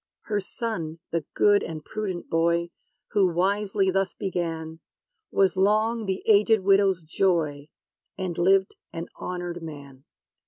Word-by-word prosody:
Her 210 -2 -1
son, 185 -6 -4
the 165 -3 -1
good 205 -1 +5
and 155 -2 -6
prudent 200 -5 -4
boy, 170 +1 +1 0.4
Who 200 -2 +3
wisely 195 +2 +1
thus 195 0 0
began, 165 -4 -3 0.5
Was 195 -1 +2
long 215 +3 +2
the 190 0 -2
aged 215 0 +5
widow's 195 -2 +3
joy; 155 -4 0 0.5
And 185 -3 -3
lived 190 +3 +3 0.2
an 165 +1 -6
honored 175 -1 -4
man. 140 -4 -10
185 Hz, 125 wpm, -26 LUFS, 165-200 Hz, 0.5 s, good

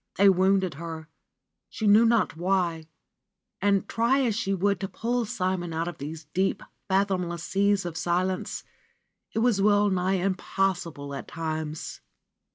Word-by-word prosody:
They 200 +1 +6
wounded 190 0 +3
her, 160 -2 -7 0.6
she 220 - -4
knew 210 +3 +6
not 230 -6 +2
why, 170 -2 0 0.7
and 200 0 +2
try 235 +4 +2
as 240 -4 +1
she 205 -3 -1
would 200 +1 +1
to 195 - -3
pull 240 +4 -1
Simon 185 -4 -2
out 165 +1 -1
of 175 - -6
these 155 +3 -7
deep, 190 +1 0 0.2
fathomless 185 -4 0
seas 200 -1 +1
of 170 -2 -4
silence, 180 +3 -1 0.7
it - - 0
was 220 -5 +3
well 205 0 +4
nigh 185 +1 +1
impossible 185 -5 -1
at 135 - -6
times. 155 -2 -4
190 Hz, 145 wpm, -27 LUFS, 170-200 Hz, 0.7 s, They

